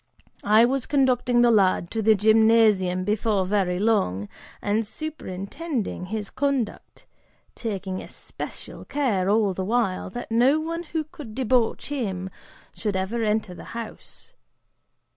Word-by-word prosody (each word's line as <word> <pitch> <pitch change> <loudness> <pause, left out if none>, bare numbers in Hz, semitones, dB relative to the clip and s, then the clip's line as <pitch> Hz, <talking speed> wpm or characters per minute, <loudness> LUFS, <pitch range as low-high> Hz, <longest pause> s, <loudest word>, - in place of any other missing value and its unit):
I 215 +3 +6
was 265 +1 -1
conducting 250 -3 +3
the 240 - +5
lad 190 -5 +3
to 225 - -1
the 220 0 +5
gymnasium 215 -3 +4
before 210 -1 +1
very 185 -2 +1
long, 100 - +1 0.3
and 210 +2 0
superintending 225 - -5
his 210 +1 -4
conduct, 275 -5 -2 0.5
taking 195 -4 -4
especial - - -8
care, 215 -10 0
all 210 -2 +3
the 190 - -3
while, 215 -3 0
that 240 +3 -7
no 255 +7 +4
one 330 +2 -3
who 320 0 -2
could 285 -7 -11
debauch 250 -1 +1
him 190 -10 -3 0.4
should 210 -3 -3
ever 190 +5 -1
enter 215 -3 0
the - - -10
house. 230 -2 -9
220 Hz, 130 wpm, -25 LUFS, 190-245 Hz, 0.5 s, I